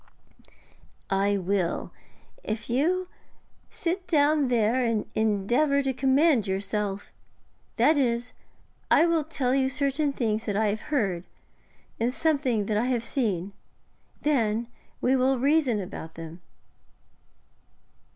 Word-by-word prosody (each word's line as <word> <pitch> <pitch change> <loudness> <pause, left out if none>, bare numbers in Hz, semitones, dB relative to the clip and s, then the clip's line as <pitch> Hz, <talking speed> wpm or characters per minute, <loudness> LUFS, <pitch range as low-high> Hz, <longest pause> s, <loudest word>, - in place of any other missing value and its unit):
'I 200 +1 +2
will, 185 -2 -1 0.5
if 220 +2 -4
you 355 +9 +1 0.6
sit 355 +2 -3
down 295 -2 +3
there 240 +1 +2
and 230 -3 0
endeavour 235 +7 +1
to 270 -1 0
command 265 -2 +3
yourself. 195 +1 -3 0.6
That 310 -1 +4
is, 240 -2 0 0.6
I 330 - +5
will 335 -2 +2
tell 275 -4 -1
you 265 -1 +2
certain 280 +1 0
things 225 -4 -1
that 205 -2 -1
I 215 -1 +2
have 215 +1 -2
heard, 195 - 0 0.7
and 235 +2 +1
something 270 -7 0
that 210 0 0
I 225 - +1
have 245 -2 0
seen. 205 -7 -2 0.7
Then 235 -6 +1 0.4
we 260 +2 +3
will 265 +1 +2
reason 275 -3 +2
about 165 -4 -7
them.' 165 +1 -9
240 Hz, 120 wpm, -26 LUFS, 210-280 Hz, 0.7 s, I